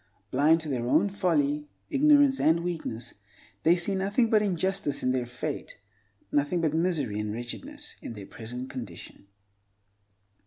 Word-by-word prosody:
Blind 150 +5 +4
to 160 - -5
their 125 -4 -2
own 160 +10 +4
folly, 150 -6 +1 0.2
ignorance, 285 -1 +5
and 160 +2 +3
weakness, 140 -9 -4 0.5
they 170 +2 +5
see 180 +3 +1
nothing 200 +5 +1
but 215 -1 +5
injustice 190 -5 -1
in 130 - +2
their 125 -2 -1
fate, 120 0 -5 0.5
nothing 145 +5 +1
but 160 -3 +1
misery 160 - 0
and 105 0 -2
wretchedness 270 - -6
in - - -6
their 105 -3 -8
present 125 +5 -7
condition. 105 -7 -9
155 Hz, 145 wpm, -28 LUFS, 125-190 Hz, 0.5 s, ignorance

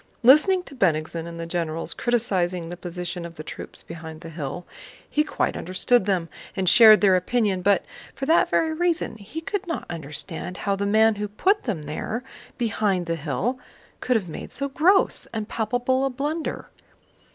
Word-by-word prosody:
Listening 305 +9 +6
to 280 - -12
Bennigsen 165 - 0
and 170 0 -8
the 165 - -4
generals 165 -1 -3
criticizing 185 -8 0
the 175 - -5
position 175 0 -5
of 170 0 -8
the 155 - -7
troops - - -9
behind 160 -1 -9
the 165 -2 -9
hill, 155 +2 -5 0.4
he 300 - +1
quite - - -1
understood 185 +5 +1
them 185 -4 0 0.3
and 190 -2 -1
shared 215 +2 +8
their 195 -3 +5
opinion, 195 0 +1
but 200 +1 +3 0.3
for 270 - -4
that 325 +4 +4
very 320 -1 +1
reason 345 -3 0
he 220 +10 -7
could 400 +3 -3
not 330 - -3
understand 165 +3 -3
how 200 -1 +2
the 200 +1 -2
man 220 +2 +4
who 210 0 -2
put 380 - +1
them 190 - -2
there 215 - -4 0.3
behind 205 -6 0
the 165 0 -1
hill 175 - -2 0.4
could 250 - 0
have 205 -5 0
made 155 - -7
so 280 0 -3
gross 360 +8 +3
and 215 -1 -3
palpable 245 +4 0
a 270 - +2
blunder. 295 +5 -3
200 Hz, 175 wpm, -24 LUFS, 170-255 Hz, 0.4 s, shared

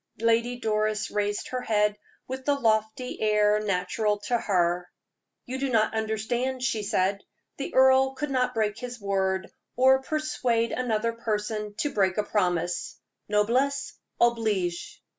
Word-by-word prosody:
Lady 230 +2 +2
Doris 215 -1 0
raised 205 0 -1
her 255 0 -3
head 210 -2 +1 0.3
with 260 +1 -5
the 285 +1 +2
lofty 220 0 0
air 210 -1 +3
natural 210 +1 0
to 240 - -1
her. 180 -5 +1 0.6
"You 260 +1 -4
do 275 0 -1
not 220 -3 +2
understand," 230 +4 -1
she 230 -4 0
said. 200 0 0 0.3
"The 275 - -5
earl 265 0 +5
could 295 +1 -3
not 250 -1 0
break 215 -1 0
his 245 -1 -6
word, 190 -2 -1 0.2
or 265 +1 +5
persuade 255 -6 0
another 230 -2 0
person 210 -2 -3
to 295 - -1
break 190 -2 +1
a 210 - +2
promise. 180 -4 -1 0.3
_Noblesse 255 +7 +1 0.3
oblige! 215 -7 0
220 Hz, 140 wpm, -27 LUFS, 210-250 Hz, 0.6 s, earl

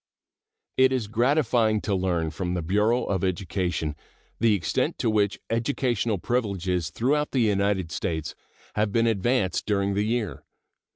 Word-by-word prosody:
It 130 0 +5
is 130 -4 0
gratifying 120 -1 +2
to 100 - -1
learn 90 -4 0
from 90 +2 -3
the 90 - -2
Bureau 105 +8 +2
of 95 -2 -1
Education 90 -4 -1 0.4
the 115 -2 +4
extent 85 -5 -1
to 110 - +1
which 105 -2 +1
educational 115 -2 0
privileges 95 -7 -1
throughout 145 - 0
the 130 - +1
United 100 -5 +1
States 80 -4 -3 0.4
have 105 -1 0
been 115 +2 +2
advanced 110 -3 +1
during 100 -1 +1
the 100 - +1
year. 110 - -2
105 Hz, 140 wpm, -26 LUFS, 90-115 Hz, 0.4 s, It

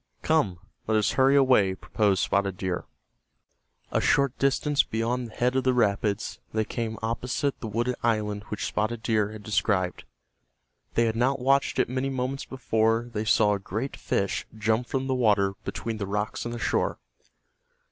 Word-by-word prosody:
"Come, 150 - +2 0.3
let 110 0 +3
us 105 - +2
hurry 135 +1 +4
away," 125 -9 +4
proposed 100 -1 +1
Spotted 100 -2 0
Deer. 95 -2 -3 1.1
A - - +1
short 140 -2 +2
distance 140 +1 +3
beyond 115 +2 -2
the 110 - -14
head 125 +1 +1
of 130 - +2
the 130 -1 +2
rapids 105 -1 0
they 110 0 +1
came 110 -1 -3
opposite 125 +5 -1
the 115 - -5
wooded 120 +4 0
island 105 -3 0
which 105 - -4
Spotted 110 +2 -2
Deer 105 -2 +1
had 110 -1 -9
described. 100 -3 0 0.9
They 115 - +4
had 110 -1 0
not 130 +4 +2
watched 135 +2 +2
it - - +3
many 130 +2 -2
moments 130 +1 -3
before 115 -2 0
they 105 0 -2
saw 105 0 +4
a 100 - -1
great 110 +8 -4
fish 100 0 -1
jump 110 +3 +1
from 135 -1 -2
the 135 - 0
water 105 -6 +3
between 115 -1 -4
the 100 -2 -4
rocks 105 +3 -2
and 120 - -3
the - - -4
shore. - - 0
115 Hz, 170 wpm, -26 LUFS, 105-125 Hz, 1.1 s, hurry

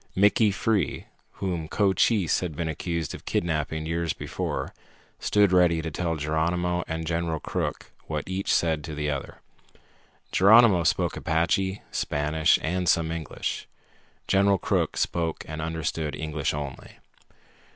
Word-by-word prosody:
Mickey 105 +3 +4
Free, 100 -3 0 0.3
whom 85 -5 -3
Cochise 100 0 +2
had 85 -5 -4
been 85 +1 -2
accused 80 +1 -3
of - - -10
kidnapping 80 -2 -1
years 85 0 -1
before, - - -4 0.5
stood 105 -2 +3
ready 90 -2 +4
to 80 0 -4
tell 85 +2 -1
Geronimo 85 +3 0
and 80 0 -3
General 80 -1 -1
Crook - - -4 0.2
what 75 -2 -3
each 95 +1 -2
said 80 -3 +2
to 80 - -6
the 75 0 -1
other. 70 -1 -6 0.9
Geronimo 100 -2 +6
spoke - - +1
Apache, 95 +4 0
Spanish, 75 +2 +2
and 90 +2 0
some 80 -1 +2
English. 80 -4 -4 0.6
General 100 0 +4
Crook - - 0
spoke 85 -2 -1
and 80 0 -5
understood 80 -1 -2
English 75 -2 -2
only. 70 -2 -7
80 Hz, 130 wpm, -26 LUFS, 80-90 Hz, 0.9 s, Geronimo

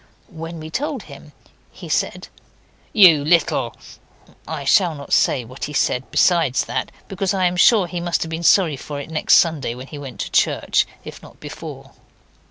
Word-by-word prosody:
When 165 +1 -7
we 155 - -9
had 160 - -10
told 290 +3 -3
him - - -13 0.4
he - - -11
said - - -2 0.6
'You 170 -9 +6
little 165 +1 +1 0.4
.' - - -32 0.2
I 155 -3 -5
shall 170 +3 +3
not 140 -1 -7
say 125 -3 +2
what 130 +3 -7
he 150 - -8
said 130 -2 0
besides 165 -8 +2
that, - - -4 0.2
because 195 0 -2
I 185 -1 +1
am 180 0 +1
sure 200 +2 +5
he 175 0 -5
must 175 0 -1
have 165 - -8
been 160 +1 -4
sorry 170 -4 +3
for 145 +2 -7
it 145 - -8
next 155 - +3
Sunday 150 -8 +1
when 130 +1 -9
he 145 +1 -10
went 130 -7 -9
to - - -5
church, - - +1 0.2
if - - -10
not - - -16
before. - - -9
160 Hz, 190 wpm, -20 LUFS, 140-175 Hz, 0.6 s, You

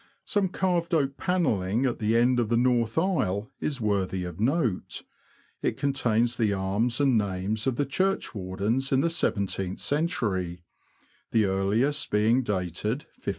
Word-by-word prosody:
Some 200 -3 +1
carved 175 -2 0
oak 140 -3 +1
panelling 120 - +1
at 125 - -1
the 110 +1 +2
end 125 +1 +3
of 115 -3 0
the 115 - +2
north 120 -1 +1
aisle 130 - 0
is 140 -3 -2
worthy 95 -4 0
of 90 0 -7
note; 115 - 0 0.6
it - - -1
contains 120 -4 +1
the 110 -4 +2
arms 100 +6 0
and 135 -5 +4
names 100 +3 -2
of 130 - +1
the 145 - 0
churchwardens 125 - -1
in 135 0 +3
the 170 - +1
seven 100 -10 +1
teenth 95 -1 -3
century, 105 - -1 0.7
the 110 -2 +3
earliest 105 +10 +1
being 110 +5 +3
dated 105 - -2
1597. - - -6
115 Hz, 150 wpm, -27 LUFS, 100-140 Hz, 0.7 s, and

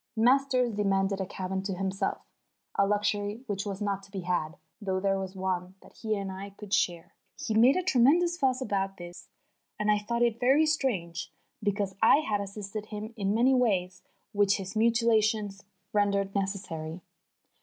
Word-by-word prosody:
Masters 255 +1 +3
demanded 195 -1 +1
a 190 - -3
cabin 190 +1 -3
to 195 -1 -3
himself, 190 +1 -2 0.5
a 200 - +2
luxury 205 +2 -1
which 205 -3 -3
was 200 +1 -4
not 200 -1 -1
to 195 - -16
be 195 -1 -5
had, 175 -3 -2 0.2
though 190 -2 -1
there 195 0 +1
was 190 0 -5
one 185 -1 -2
that - - -17
he 220 -1 -1
and 195 -1 -4
I 195 +2 -7
could 210 -1 -7
share. 170 -2 0 0.2
He 220 - -3
made 235 +5 +6
a 370 - 0
tremendous 340 +3 +4
fuss 265 -5 +1
about 195 -4 -1
doing 175 0 -7
this, 175 +1 -13 0.5
and 210 0 +2
I 210 - +3
thought 235 +3 -1
it 235 -1 +1
very 270 +5 +4
strange, 195 - -1 0.3
because 200 -2 -1
I 250 +6 +6
had 205 -2 0
assisted 205 +1 -6
him 215 +2 -6
in 200 -1 0
many 250 +4 +4
ways 190 -7 +1 0.3
which 205 -1 +3
his 195 +1 -7
mutilation 220 -2 +2 0.4
rendered 200 -1 +1
necessary. 185 -4 -3
205 Hz, 175 wpm, -29 LUFS, 195-225 Hz, 0.5 s, made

